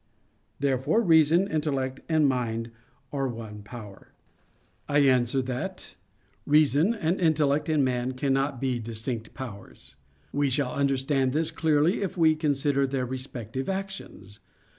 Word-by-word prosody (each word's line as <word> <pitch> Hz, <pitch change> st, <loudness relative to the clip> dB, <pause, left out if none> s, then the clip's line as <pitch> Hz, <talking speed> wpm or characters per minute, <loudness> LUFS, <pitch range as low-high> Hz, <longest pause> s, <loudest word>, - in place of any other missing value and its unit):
Therefore, 140 Hz, -, +1 dB
reason, 165 Hz, +1 st, +5 dB
intellect 140 Hz, -6 st, -2 dB
and 155 Hz, -2 st, +4 dB
mind 115 Hz, -3 st, -2 dB, 0.4 s
are 135 Hz, -1 st, 0 dB
one 110 Hz, -3 st, -7 dB
power. 105 Hz, -2 st, -11 dB, 0.8 s
I 145 Hz, -, +2 dB
answer 130 Hz, -2 st, +3 dB
that, 125 Hz, 0 st, -5 dB, 0.5 s
Reason 150 Hz, -, +4 dB
and 175 Hz, -3 st, -1 dB
intellect 150 Hz, -2 st, +2 dB
in 155 Hz, -3 st, +3 dB
man 125 Hz, 0 st, -1 dB
cannot 135 Hz, 0 st, 0 dB
be 130 Hz, -2 st, -1 dB
distinct 115 Hz, 0 st, -4 dB
powers. 100 Hz, -, -10 dB, 0.4 s
We 145 Hz, 0 st, +1 dB
shall 130 Hz, -1 st, 0 dB
understand 135 Hz, -1 st, +1 dB
this 160 Hz, +1 st, 0 dB
clearly 160 Hz, +4 st, +2 dB
if 190 Hz, -2 st, -3 dB
we 160 Hz, -2 st, +4 dB
consider 145 Hz, -2 st, +1 dB
their 130 Hz, -1 st, -1 dB
respective 130 Hz, -, -5 dB
actions. 190 Hz, -, -6 dB
135 Hz, 125 wpm, -27 LUFS, 125-155 Hz, 0.8 s, reason